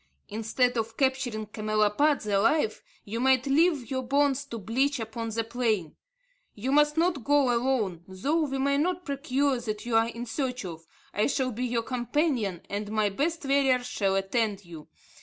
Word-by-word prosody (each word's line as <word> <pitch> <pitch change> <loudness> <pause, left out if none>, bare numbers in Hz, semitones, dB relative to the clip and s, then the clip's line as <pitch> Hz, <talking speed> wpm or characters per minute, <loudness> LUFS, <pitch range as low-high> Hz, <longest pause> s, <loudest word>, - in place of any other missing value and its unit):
Instead 230 +3 0
of 225 0 -3
capturing 260 -5 0
camelopards 215 +6 +1
alive, 215 +5 +2 0.2
you 225 +3 -4
might 260 0 +3
leave 285 -3 +2
your 260 -1 0
bones 280 +1 +1
to 235 -4 -6
bleach 255 +7 0
upon 225 +1 -4
the 225 +1 -1
plain. 225 -8 -1 0.6
You 245 +6 -2
must 295 +1 +4
not 330 -6 +1
go 280 -1 +3
alone. 230 -9 0
Though 285 - 0
we 270 -1 -3
may 280 +1 +1
not 360 +3 -1
procure 275 -1 0
what 215 -2 -4
you 240 -2 -1
are 225 0 +4
in 235 +1 -6
search 250 -1 -3
of, 165 -2 -8 0.3
I 210 - +2
shall 260 -2 0
be 245 +3 -3
your 235 -1 -1
companion, 245 - -1
and 205 +1 -4
my 215 -1 +2
best 305 - -2
warriors 270 -2 +3
shall 195 -5 0
attend 200 0 -1
you. 165 -3 -11
245 Hz, 170 wpm, -27 LUFS, 215-275 Hz, 0.6 s, must